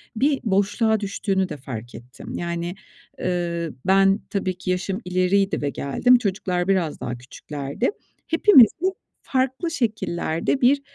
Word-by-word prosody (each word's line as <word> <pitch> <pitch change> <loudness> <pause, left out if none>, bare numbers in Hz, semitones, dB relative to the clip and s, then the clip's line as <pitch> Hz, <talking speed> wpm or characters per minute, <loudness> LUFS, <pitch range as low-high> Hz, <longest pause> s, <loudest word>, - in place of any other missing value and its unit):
bir 275 +4 +2
boşluğa 205 +2 +2
düştüğünü 195 -2 -1
de 150 - -6
fark 120 -3 -8
ettim. 125 +2 -10
Yani, 170 +1 -3 0.5
ııı, 170 -2 -2
ben 195 +1 +4
tabii 185 -3 -2
ki 185 - -3
yaşım 190 +3 -2
ileriydi 185 +2 +1
ve 145 - 0
geldim. 195 - +3
Çocuklar 190 -5 -1
biraz 185 -6 0
daha 120 0 -4
küçüklerdi. 140 - -4 0.4
Hepimiz 330 - +7
bu 375 +1 0 0.3
farklı 265 +6 -1
şekillerde 215 - -1
bir, 275 +3 +4
190 Hz, 130 wpm, -23 LUFS, 170-225 Hz, 0.5 s, Hepimiz